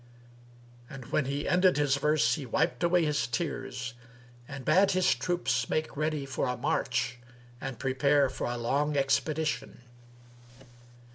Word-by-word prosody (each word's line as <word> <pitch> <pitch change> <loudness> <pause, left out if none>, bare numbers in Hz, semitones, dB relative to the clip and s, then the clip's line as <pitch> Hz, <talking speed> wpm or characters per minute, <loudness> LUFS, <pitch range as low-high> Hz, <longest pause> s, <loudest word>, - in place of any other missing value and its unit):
And 130 -3 -9
when 150 - +1
he 140 +2 -3
ended 180 -1 +4
his 145 -2 +2
verse, 150 +1 +2
he 150 - -3
wiped 150 +7 0
away 170 -1 +3
his 145 -6 0
tears 125 +1 -4 0.5
and 140 -2 -8
bade 195 +1 +4
his 185 0 +3
troops 175 -1 -1
make 155 0 -1
ready 155 -1 -1
for 135 -1 -2
a 125 0 -2
march 125 0 -1 0.4
and 135 -3 -5
prepare 140 +3 +2
for 130 - -4
a 120 0 -3
long 145 +5 0
expedition. 150 +2 -1
140 Hz, 140 wpm, -29 LUFS, 130-155 Hz, 0.5 s, ended